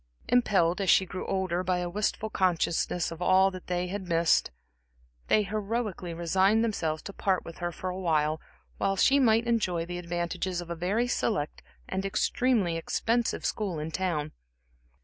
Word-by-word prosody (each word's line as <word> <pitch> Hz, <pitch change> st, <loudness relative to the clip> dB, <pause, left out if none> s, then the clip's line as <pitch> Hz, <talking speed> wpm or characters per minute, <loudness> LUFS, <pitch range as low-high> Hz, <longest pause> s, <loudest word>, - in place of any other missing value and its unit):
Impelled, 200 Hz, -7 st, +3 dB
as 190 Hz, -, 0 dB
she 190 Hz, -, +6 dB
grew 185 Hz, +1 st, -6 dB
older, 185 Hz, -2 st, -1 dB
by 185 Hz, 0 st, +1 dB
a 180 Hz, 0 st, -2 dB
wistful 210 Hz, +3 st, -2 dB
consciousness 175 Hz, -2 st, 0 dB
of 165 Hz, +1 st, -8 dB
all 190 Hz, +2 st, +4 dB
that 185 Hz, -1 st, -10 dB
they 180 Hz, 0 st, -1 dB
had 190 Hz, +1 st, -5 dB
missed, 170 Hz, -1 st, +3 dB, 0.8 s
they 215 Hz, -, +4 dB
heroically 210 Hz, -2 st, -3 dB
resigned 190 Hz, +6 st, +2 dB
themselves 160 Hz, -9 st, -1 dB
to 200 Hz, -, -7 dB
part 190 Hz, -2 st, 0 dB
with 170 Hz, -, -10 dB
her 175 Hz, -1 st, -2 dB
for 185 Hz, +2 st, -4 dB
a 185 Hz, -, -5 dB
while 155 Hz, -3 st, +1 dB, 0.4 s
that 195 Hz, 0 st, +1 dB
she 275 Hz, +1 st, +5 dB
might 230 Hz, -3 st, +4 dB
enjoy 185 Hz, -8 st, 0 dB
the 175 Hz, +1 st, -5 dB
advantages 175 Hz, +1 st, -3 dB
of 175 Hz, -1 st, -6 dB
a -, -, -2 dB
very 195 Hz, +8 st, 0 dB
select 210 Hz, -10 st, -1 dB, 0.3 s
and 190 Hz, -, -2 dB
extremely 200 Hz, -2 st, +1 dB
expensive 230 Hz, +7 st, -1 dB
school 195 Hz, -6 st, -2 dB
in 155 Hz, +1 st, -4 dB
town. 155 Hz, -4 st, -1 dB
185 Hz, 170 wpm, -28 LUFS, 170-205 Hz, 0.8 s, she